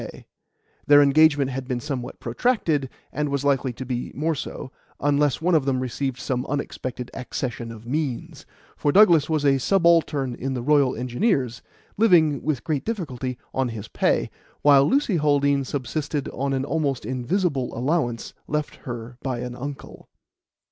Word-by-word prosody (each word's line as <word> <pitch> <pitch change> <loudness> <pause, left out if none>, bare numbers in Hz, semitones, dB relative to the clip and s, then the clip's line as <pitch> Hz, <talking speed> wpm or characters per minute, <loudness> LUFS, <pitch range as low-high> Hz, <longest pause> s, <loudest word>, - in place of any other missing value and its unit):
Their 145 0 +8
engagement 145 -1 +4
had 130 0 -5
been 125 -2 -1
somewhat 125 -2 -5
protracted, 150 - 0 0.2
and 150 +1 -1
was 140 0 -1
likely 135 -2 +2
to 130 - -7
be 125 -1 -3
more 160 +4 0
so, 130 -2 -6 0.3
unless 145 +1 +1
one 180 +1 +2
of 155 -5 +3
them 135 -2 +1
received 130 +1 -3
some 130 -1 -2
unexpected 130 -3 -4
accession 120 -2 -4
of 115 0 -11
means; 150 +3 -3 0.3
for 145 - +1
Douglas 170 -6 +6
was 155 -2 0
a 135 -1 +4
subaltern 165 -6 +2
in 130 +2 -4
the 120 - -3
Royal 140 -1 +3
Engineers, 125 - 0 0.4
living, 165 - +4
with 145 -4 -2
great 150 -4 -1
difficulty, 130 - -4 0.2
on 130 -2 0
his 110 -2 -7
pay, - - +1 0.3
while 140 -1 +6
Lucy 260 -8 +2
Haldean 140 -2 +2
subsisted 145 +2 -3
on 140 +1 -2
an 135 0 -1
almost 145 -6 -1
invisible 130 - -1
allowance 125 -2 -1
left 150 0 -2
her 120 -1 -8
by 130 -3 -3
an 125 0 -5
uncle. 140 +2 -8
140 Hz, 155 wpm, -24 LUFS, 125-150 Hz, 0.4 s, Their